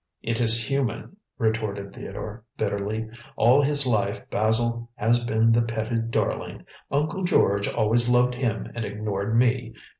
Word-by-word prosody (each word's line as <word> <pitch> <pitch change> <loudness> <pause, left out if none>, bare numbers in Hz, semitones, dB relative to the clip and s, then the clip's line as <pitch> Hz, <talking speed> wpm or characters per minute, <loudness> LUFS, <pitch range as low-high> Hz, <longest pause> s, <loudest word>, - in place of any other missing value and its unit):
"It 115 +1 -1
is 115 -1 +5
human," 135 - -2 0.2
retorted 110 -4 -2
Theodore 110 +1 -8
bitterly. 105 +1 -2 0.3
"All 125 +5 +5
his 145 0 +2
life 105 -5 -1
Basil 115 +2 +1
has 115 +3 +2
been 115 -1 +2
the 115 +1 +4
petted 115 0 -2
darling. - - -2 0.2
Uncle 150 +7 -1
George 100 - +2
always 120 +3 +1
loved 125 0 +3
him 120 -4 -3
and 120 - -4
ignored 105 +1 -2
me. 120 -1 +1
115 Hz, 140 wpm, -25 LUFS, 110-120 Hz, 0.3 s, is